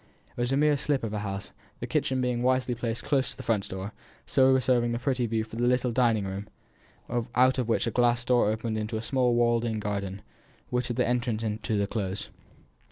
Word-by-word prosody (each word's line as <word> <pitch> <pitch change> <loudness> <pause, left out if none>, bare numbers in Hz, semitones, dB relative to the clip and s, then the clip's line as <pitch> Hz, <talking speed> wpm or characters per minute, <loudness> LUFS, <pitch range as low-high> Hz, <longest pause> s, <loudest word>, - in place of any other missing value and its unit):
It - - -4
was 120 +1 0
a 135 - +2
mere 150 0 +4
slip 140 -2 -1
of 110 -2 -3
a 105 - -1
house; 100 -1 -5 0.3
the - - -3
kitchen 130 -1 0
being 125 -1 0
wisely 130 0 +2
placed 115 -1 -3
close 135 -3 +1
to 130 - -7
the - - -7
front 105 -4 0
door, 95 0 -5
and 100 - -6 0.3
so 130 0 +4
reserving 125 -2 +2
the - - 0
pretty 125 -1 0
view 110 0 0
for 110 +1 -9
the 120 +1 +1
little 125 0 +2
dining 115 -4 +2
room, 95 +2 -5 0.9
out 130 +2 +4
of 120 -2 -1
which 115 - +2
a 115 - -1
glass 120 0 +2
door 125 -4 +3
opened 110 0 -2
into 110 +1 -3
a - - -3
small 125 -1 +2
walled 120 -1 +3
in 115 -2 -1
garden, 100 -2 -3 0.5
which 125 0 0
had 120 - -3
again 125 - +3
an 125 - +3
entrance 120 -2 -2
into 110 0 -2
the 100 - +2
Close. 100 -2 -3
120 Hz, 230 wpm, -28 LUFS, 110-125 Hz, 0.9 s, mere